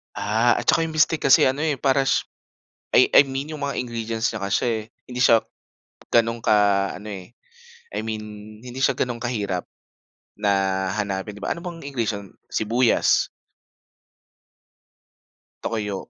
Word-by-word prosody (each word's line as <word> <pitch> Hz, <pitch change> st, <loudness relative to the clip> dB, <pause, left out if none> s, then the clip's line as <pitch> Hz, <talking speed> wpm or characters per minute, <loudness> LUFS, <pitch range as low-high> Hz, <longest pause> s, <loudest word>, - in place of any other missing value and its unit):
Ah, 110 Hz, +4 st, +2 dB
at -, -, -2 dB
saka -, -, +3 dB
'yong 160 Hz, -, -7 dB
bistek 155 Hz, 0 st, +2 dB
kasi 135 Hz, -, +7 dB
ano 130 Hz, +2 st, +2 dB
eh, 155 Hz, -2 st, +1 dB
parash 135 Hz, 0 st, +2 dB, 0.7 s
I -, -, +6 dB
I -, -, +8 dB
mean 135 Hz, +3 st, -4 dB
'yong 155 Hz, -, -6 dB
mga 140 Hz, -1 st, -2 dB
ingredients 115 Hz, -1 st, -2 dB
niya 110 Hz, -, -5 dB
kasi 110 Hz, +1 st, 0 dB, 0.2 s
hindi 125 Hz, 0 st, -6 dB
siya 115 Hz, -2 st, +5 dB, 0.7 s
gano'n 115 Hz, 0 st, +2 dB
ka 105 Hz, -, +4 dB, 0.4 s
ano, 105 Hz, -, -10 dB
eh, 95 Hz, +4 st, -9 dB, 0.6 s
I -, -, -1 dB
mean 110 Hz, -1 st, -4 dB, 0.4 s
hindi 125 Hz, +1 st, -8 dB
siya 135 Hz, -, +3 dB
gano'n 120 Hz, -2 st, -2 dB
kahirap 105 Hz, -7 st, -2 dB, 0.8 s
na 105 Hz, -1 st, +1 dB, 0.5 s
hanapin 100 Hz, 0 st, -3 dB
'di -, -, -16 dB
ba, -, -, 0 dB
ano -, -, -9 dB
bang 170 Hz, -2 st, -7 dB
ingredients, 110 Hz, -8 st, -3 dB, 0.2 s
sibuyas 115 Hz, +3 st, +2 dB, 2.4 s
toyo. 105 Hz, -4 st, -3 dB
115 Hz, 140 wpm, -23 LUFS, 105-135 Hz, 2.4 s, I